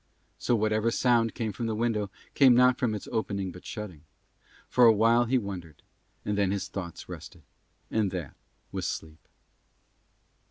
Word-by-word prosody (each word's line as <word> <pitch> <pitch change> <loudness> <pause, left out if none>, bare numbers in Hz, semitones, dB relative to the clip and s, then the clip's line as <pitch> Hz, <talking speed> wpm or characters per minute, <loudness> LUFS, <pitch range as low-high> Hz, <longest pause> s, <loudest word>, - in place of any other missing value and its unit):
So 120 - +2
whatever 110 +1 +1
sound 115 -1 +2
came 110 -3 -2
from 115 +4 -3
the 110 - -1
window 110 -3 0 0.2
came 130 -3 +6
not 125 0 +5
from 115 -5 +1
its 105 - -7
opening 100 -5 -2
but 90 +1 -12
shutting: 105 -9 -7 0.7
for 125 - +5
a 115 - +9
while 115 +3 +4
he 130 +3 +2
wondered; 90 - -6 0.4
and 105 - 0
then 100 -2 +2
his 100 0 -2
tired - - -28
thoughts 85 -4 -6
rested, - - -10 0.5
and 110 -3 +1
that 85 -7 -5 0.4
was - - -3
sleep. 80 0 -6
110 Hz, 165 wpm, -28 LUFS, 95-115 Hz, 0.7 s, a